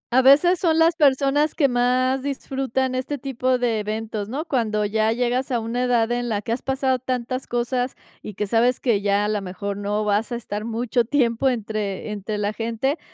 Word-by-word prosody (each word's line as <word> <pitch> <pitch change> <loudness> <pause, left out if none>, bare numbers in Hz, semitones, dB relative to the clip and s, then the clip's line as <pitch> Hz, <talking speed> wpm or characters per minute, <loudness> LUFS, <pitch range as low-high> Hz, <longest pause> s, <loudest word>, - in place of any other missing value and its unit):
A 260 - +7
veces 300 +7 +5
son 325 -3 +2
las 325 +1 +4
personas 290 0 +2
que 285 - +3
más 255 +1 +1
disfrutan 265 -2 -2
este 260 +3 -2
tipo 255 -1 0
de 240 -3 0
eventos, 215 0 -4
¿no? 285 +7 -3
Cuando 215 -8 0
ya 220 +1 +1
llegas 245 +2 0
a 240 - +1
una 240 +3 -2
edad 240 -1 +2
en 240 0 -1
la 210 -2 -1
que 230 - -4
has 235 - -1
pasado 265 -1 0
tantas 255 0 -3
cosas 245 +1 -1 0.3
y 210 - -8
que 210 - -1
sabes 235 +4 +2
que 225 -6 +1
ya, 200 0 +1
a - - 0
la 210 -1 -1
mejor, 195 +2 -5
no 205 +1 -2
vas 210 +2 0
a 240 - -1
estar 210 -2 -5
mucho 235 +1 0
tiempo 245 0 +1
entre 215 -4 -3
entre 210 +1 -4
la 205 0 -1
gente, 230 +7 -2
240 Hz, 200 wpm, -23 LUFS, 215-265 Hz, 0.3 s, A